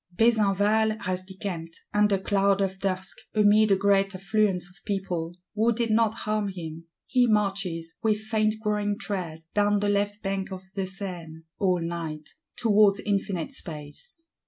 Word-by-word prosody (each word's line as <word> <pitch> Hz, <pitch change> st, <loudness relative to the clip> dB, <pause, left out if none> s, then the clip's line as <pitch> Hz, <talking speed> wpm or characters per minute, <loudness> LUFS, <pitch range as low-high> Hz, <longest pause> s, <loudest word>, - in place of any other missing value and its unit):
Besenval 215 Hz, 0 st, +3 dB
has 185 Hz, 0 st, -2 dB
decamped, 185 Hz, -4 st, -6 dB
under 210 Hz, -1 st, +4 dB
cloud 195 Hz, +1 st, +2 dB
of 190 Hz, -1 st, -1 dB
dusk, 190 Hz, -1 st, -2 dB, 0.2 s
"amid 215 Hz, 0 st, +5 dB
a 195 Hz, -, +6 dB
great 195 Hz, 0 st, +2 dB
affluence 195 Hz, -2 st, +1 dB
of 180 Hz, +2 st, -18 dB
people," 180 Hz, -4 st, -3 dB, 0.2 s
who 220 Hz, +2 st, +3 dB
did 230 Hz, 0 st, 0 dB
not 220 Hz, 0 st, +3 dB
harm 215 Hz, -1 st, 0 dB
him; 165 Hz, -4 st, -7 dB, 0.2 s
he 250 Hz, -1 st, +3 dB
marches, 195 Hz, -6 st, 0 dB
with 220 Hz, -2 st, +2 dB
faint 215 Hz, 0 st, +1 dB
growing 210 Hz, -1 st, 0 dB
tread, 170 Hz, -7 st, -4 dB
down 205 Hz, 0 st, +3 dB
the 205 Hz, 0 st, +1 dB
left 205 Hz, +1 st, 0 dB
bank 195 Hz, 0 st, -2 dB
of 190 Hz, 0 st, -6 dB
the 195 Hz, -1 st, -2 dB
Seine, 175 Hz, -5 st, -7 dB, 0.2 s
all 185 Hz, -3 st, +2 dB
night,—towards 170 Hz, +6 st, 0 dB
infinite 200 Hz, 0 st, -1 dB
space. 165 Hz, -, -8 dB
195 Hz, 145 wpm, -26 LUFS, 185-210 Hz, 0.2 s, a